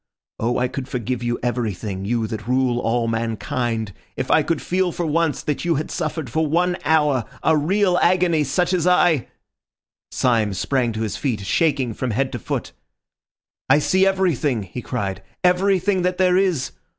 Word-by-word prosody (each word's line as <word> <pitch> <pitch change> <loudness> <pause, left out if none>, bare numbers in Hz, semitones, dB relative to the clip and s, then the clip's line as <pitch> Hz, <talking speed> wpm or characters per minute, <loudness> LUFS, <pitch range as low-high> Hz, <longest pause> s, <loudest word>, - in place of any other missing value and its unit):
Oh, 120 +2 0
I 125 - +1
could 130 +1 -6
forgive 125 -1 -3
you 120 0 -1
everything, 105 -5 -2
you 115 +1 0
that 110 0 -6
rule 125 -1 +1
all 115 0 0
mankind, 115 -1 -2 0.2
if - - -2
I - - +5
could 165 -3 -1
feel 185 0 0
for 175 - -3
once 160 0 0
that 150 - -2
you 170 -1 +1
had 150 - -3
suffered 155 -3 -3
for 160 +7 0
one 175 +4 +1
hour 150 -5 +2 0.2
a 160 - +4
real 180 +4 +2
agony 175 -3 +3
such 175 +6 0
as 180 -1 +1
I—" 175 -6 +3 0.8
Syme 115 -6 +1
sprang 125 +5 0
to 110 - -4
his 110 - -3
feet, 125 -8 -2
shaking 130 +2 +1
from 130 +3 -3
head 130 +4 0
to 120 - -4
foot. - - -4 1.0
"I 135 - +6
see 190 +5 +3
everything," 160 - +1
he 95 +6 -7
cried, 100 -6 -3 0.2
"everything 185 +1 +2
that 180 0 0
there 185 -1 +3
is. 180 -8 +1
135 Hz, 175 wpm, -21 LUFS, 115-175 Hz, 1.0 s, I